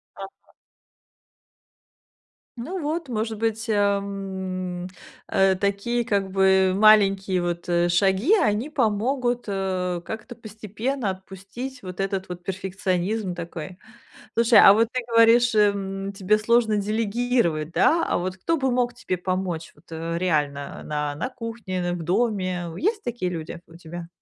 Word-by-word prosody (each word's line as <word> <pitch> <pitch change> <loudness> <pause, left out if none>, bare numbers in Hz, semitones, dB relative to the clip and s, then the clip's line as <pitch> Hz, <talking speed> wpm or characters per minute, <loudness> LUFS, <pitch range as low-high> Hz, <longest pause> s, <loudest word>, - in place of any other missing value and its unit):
Ага. 195 0 -12 2.0
Ну 340 +11 -5
вот, 315 0 -3
может 220 -2 -3
быть, 225 +1 -2
э, - - +2
м, 190 -3 -2 0.4
э, 190 0 +3
такие, 200 +5 -1
как 200 -3 0
бы 190 0 +4
маленькие 195 -3 +4
вот, 175 0 -3
э, 175 0 +2
шаги, 190 - +2
они 220 +3 0
помогут, 245 0 0
э, 185 -2 -2
как-то 220 +4 -7
постепенно 220 +2 -4
отпустить 195 +7 -8
вот 185 -2 -8
этот 195 -1 -2
вот 175 0 -8
перфекционизм 190 +1 -2
такой. 170 +1 -7 0.6
Слушай, 230 0 +5
а 195 - +9
вот 225 +2 +3
ты 255 - 0
говоришь, 230 +1 +5
э, 210 -1 +5
м, 195 0 -5
тебе 200 +1 +2
сложно 220 0 +2
делегировать, 210 -6 0
да, 330 - +3
а - - 0
вот 185 +1 -3
кто 330 - -1
бы 265 -2 +1
мог 245 0 +1
тебе 240 -6 -3
помочь 180 -2 -3
вот, 155 +4 -24
э, 165 +1 -3
реально 145 -5 -1
на 150 -1 -2
на 165 - -4
кухне, 230 -6 -5
н 175 0 -1
в 170 - -6
доме? 185 -1 0
Есть 415 - 0
такие 235 - -3
люди 165 0 -6
у 165 - -15
тебя? 170 0 -8
195 Hz, 145 wpm, -24 LUFS, 180-230 Hz, 2.0 s, а